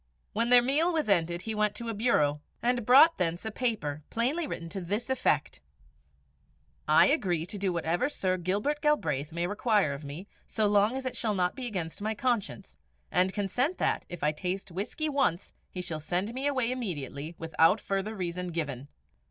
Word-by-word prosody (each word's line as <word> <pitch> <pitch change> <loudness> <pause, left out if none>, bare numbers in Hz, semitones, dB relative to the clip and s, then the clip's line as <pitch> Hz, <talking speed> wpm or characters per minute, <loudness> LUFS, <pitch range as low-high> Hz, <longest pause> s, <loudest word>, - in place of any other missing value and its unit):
When 230 +2 +1
their 245 -1 +7
meal 300 +7 +3
was 315 -8 -1
ended, 175 -2 +1
he 220 - -3
went 210 -1 +1
to 235 - -5
a 230 - -2
bureau, 150 -10 +1 0.2
and 240 -2 0
brought 280 +5 +7
thence 175 +2 -1
a 220 - -2
paper, 210 - -2
plainly 280 +8 0
written 165 - -5
to 195 +2 -5
this 205 +8 -2
effect: 260 - 0 1.3
"I - - +7
agree 185 - +1
to 205 - -6
do 195 -1 0
whatever 175 - 0
Sir 185 -10 -1
Gilbert 205 - -1
Galbraith 150 - 0
may 170 +1 -2
require 205 - +1
of 140 +2 -8
me, 150 +7 -8 0.2
so 220 - 0
long 205 +3 +3
as 265 - -5
it 255 - -3
shall 215 -3 0
not 180 -1 +1
be 255 -2 -4
against 180 -5 -4
my 215 +1 -1
conscience; 210 -4 -2 0.3
and 180 +1 +3
consent 245 - -1
that, - - -1
if 175 - -7
I 150 - +3
taste 180 +5 -4
whisky 210 - -3
once, 270 - 0 0.2
he 180 - -5
shall 160 -3 -4
send 180 +8 -2
me 265 +3 -2
away 260 -4 0
immediately, 160 - -5
without 165 +4 +3
further 200 +3 -3
reason 180 -1 -3
given." 145 -6 -4
200 Hz, 185 wpm, -29 LUFS, 170-245 Hz, 1.3 s, their